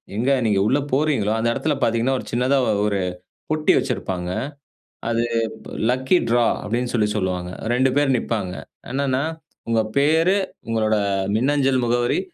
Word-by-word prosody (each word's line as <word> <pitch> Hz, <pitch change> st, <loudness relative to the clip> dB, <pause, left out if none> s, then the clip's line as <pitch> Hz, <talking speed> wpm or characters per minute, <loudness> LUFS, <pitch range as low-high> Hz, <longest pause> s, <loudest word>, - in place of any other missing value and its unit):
எங்க 120 Hz, +5 st, 0 dB, 0.2 s
நீங்க 105 Hz, -3 st, +2 dB
உள்ள 135 Hz, +5 st, +3 dB
போறீங்களோ 135 Hz, -7 st, +2 dB
அந்த 115 Hz, +1 st, +1 dB
இடத்துல 155 Hz, +3 st, 0 dB
பார்த்தீங்கன்னா, 115 Hz, +3 st, +1 dB
ஒரு -, -, -8 dB
சின்னதா 125 Hz, +4 st, +2 dB, 0.3 s
1 100 Hz, -1 st, 0 dB, 0.5 s
பொட்டி 155 Hz, 0 st, +3 dB
வச்சிருப்பாங்க. 95 Hz, -8 st, -2 dB, 0.8 s
அது 115 Hz, 0 st, +1 dB, 0.7 s
லக்கி 130 Hz, +8 st, +2 dB
டிரா 120 Hz, 0 st, +3 dB, 0.2 s
அப்டின்னு 120 Hz, +3 st, -2 dB
சொல்லி 110 Hz, -3 st, +2 dB
சொல்லுவாங்க. 90 Hz, -3 st, -2 dB, 0.2 s
2 130 Hz, +2 st, +3 dB
பேர் 145 Hz, -2 st, +3 dB
நிப்பாங்க. 105 Hz, -6 st, -2 dB, 0.4 s
என்னன்னா, 135 Hz, 0 st, 0 dB, 0.5 s
உங்க 115 Hz, -1 st, +3 dB, 0.2 s
பெயர் 160 Hz, +6 st, +4 dB, 0.3 s
உங்களோட 110 Hz, -1 st, +1 dB, 0.4 s
மின்னஞ்சல் 135 Hz, +1 st, +2 dB
முகவரி, 120 Hz, 0 st, +1 dB
120 Hz, 130 wpm, -22 LUFS, 110-135 Hz, 0.8 s, பெயர்